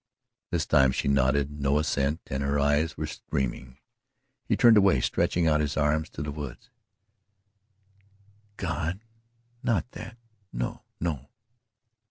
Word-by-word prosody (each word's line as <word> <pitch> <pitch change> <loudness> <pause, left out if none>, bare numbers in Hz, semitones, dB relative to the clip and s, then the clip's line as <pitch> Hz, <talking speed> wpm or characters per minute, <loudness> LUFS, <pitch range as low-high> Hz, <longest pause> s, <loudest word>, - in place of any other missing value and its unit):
This - - 0
time 65 -1 +4
she - - -2
nodded 70 +2 +1
no 70 +1 +2
assent 75 0 0
and 65 +1 -3
her 70 +1 0
eyes 75 +3 +1
were 80 - -2
streaming. 65 -3 -4 0.7
He - - +2
turned 120 -2 +7
away 100 -2 +5
stretching 85 -1 +1
out 75 -1 +3
his 75 -1 -2
arms 75 +1 +1
to 70 - -6
the 75 - -4
woods. 70 -4 -8 1.9
"God! 90 +1 -2 0.6
Not 120 0 0
that 115 - -9 0.3
no - - -4 0.2
no!" 75 -5 -3
75 Hz, 130 wpm, -27 LUFS, 70-80 Hz, 1.9 s, turned